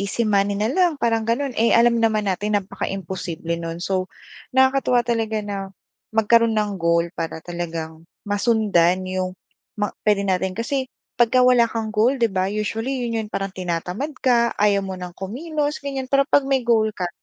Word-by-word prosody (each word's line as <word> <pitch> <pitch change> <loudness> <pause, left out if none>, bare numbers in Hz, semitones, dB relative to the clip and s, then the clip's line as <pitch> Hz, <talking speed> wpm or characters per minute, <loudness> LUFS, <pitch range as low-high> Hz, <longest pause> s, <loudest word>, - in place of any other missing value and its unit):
easy 200 +4 -1
money 200 -1 +2
na 215 +2 0
lang 360 -2 +3
parang 225 -1 +1
gano'n. 250 +3 -1
Eh 230 +1 +3
alam 235 0 +5
naman 220 -2 +1
natin 205 +3 -1
napaka-imposible 180 -3 -4
no'n. 165 0 -5
So 185 0 -1 0.4
nakakatuwa 265 -1 +3
talaga 225 -2 -1
na 205 -1 -5 0.6
magkaroon 230 +1 +4
ng 210 -2 -1
goal 170 -1 +1
para 165 -1 -4
talagang 165 -2 -6 0.2
masundan 200 -4 +2
'yong 185 0 -2 0.5
ma 205 - +1 0.2
puwede 210 -2 +3
natin 190 0 0
kasi 260 +6 -2 0.3
pagka 240 +1 +4
wala 250 -1 +5
kang 225 -1 -3
goal 215 +4 +2
'di 230 - +4
ba? 185 -2 -1
Usually 225 +5 -2
'yon 225 -1 -2
'yon - - -10
parang 195 0 -2
tinatamad 180 - -3
ka. 235 -2 +3
Ayaw 200 -1 +3
mo 190 -1 -6
nang 180 -1 -8
kumilos 295 - -3
ganyan 275 -2 -4
pero 275 0 +3
'pag 285 -3 +4
may 270 -1 +1
goal 225 -2 +2
ka 180 -3 -3
215 Hz, 170 wpm, -22 LUFS, 185-235 Hz, 0.6 s, alam